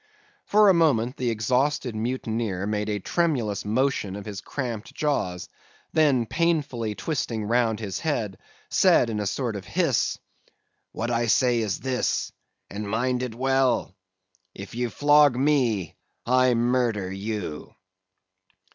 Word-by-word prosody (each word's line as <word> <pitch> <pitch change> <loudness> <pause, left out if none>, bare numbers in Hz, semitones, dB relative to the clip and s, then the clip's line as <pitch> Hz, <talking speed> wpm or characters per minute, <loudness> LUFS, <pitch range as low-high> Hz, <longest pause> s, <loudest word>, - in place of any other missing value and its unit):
"For 210 0 +5
a - - +6
moment 135 -8 +2
the 125 -1 -1
exhausted 125 +4 0
mutineer 110 -4 -2
made 105 0 -2
a 105 - 0
tremulous 120 - -1
motion 110 -3 0
of 100 -1 -7
his 105 -1 -6
cramped 120 -6 -5
jaws, 95 -12 -1
and - - -30
then 140 -7 +3
painfully 140 -8 -1
twisting 115 - -2
round 115 -1 +1
his 100 -4 -4
head, 115 - -2 0.3
said 115 - +4
in 105 - -2
a 105 - -1
sort 115 +1 -2
of 100 - -6
hiss, - - 0 0.7
'What 120 +2 -3
I 120 0 +1
say 120 +1 +3
is 110 -3 -1
this—and 105 -5 -4
mind 125 +3 0
it 125 -3 -4
well—if 95 -8 -3
you 120 +1 -2
flog 145 0 +4
me, 125 - +1 0.3
I 130 0 +3
murder 120 -5 0
you! 95 -5 -5
115 Hz, 130 wpm, -25 LUFS, 105-130 Hz, 0.7 s, a